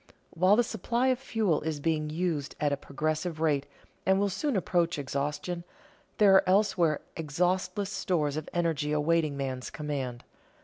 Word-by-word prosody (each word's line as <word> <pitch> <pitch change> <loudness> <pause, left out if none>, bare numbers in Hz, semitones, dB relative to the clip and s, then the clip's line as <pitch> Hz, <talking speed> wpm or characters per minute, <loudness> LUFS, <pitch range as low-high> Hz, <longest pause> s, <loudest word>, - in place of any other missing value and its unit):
_ - - -22 0.2
While 185 +4 +4
the 240 - +4
supply 235 +4 0
of 255 -1 +1
fuel 220 - 0
is 155 -1 -3
being 155 0 0
used 155 -3 -2
at 145 -1 +1
a - - +2
progressive 155 +4 -3
rate 145 -3 +1 0.4
and 190 +1 +3
will 200 0 +2
soon 260 +8 -1
approach 175 -3 +1
exhaustion, 150 +5 -3 0.5
there 205 -2 +6
are 190 -1 +5
elsewhere 185 -6 +3
exhaustless 180 +6 -1
stores 155 -9 0
of 155 -1 -4
energy 160 -4 0
awaiting 150 -1 +1
man's 130 -2 -3
command. 135 -5 -4
165 Hz, 160 wpm, -29 LUFS, 150-190 Hz, 0.5 s, there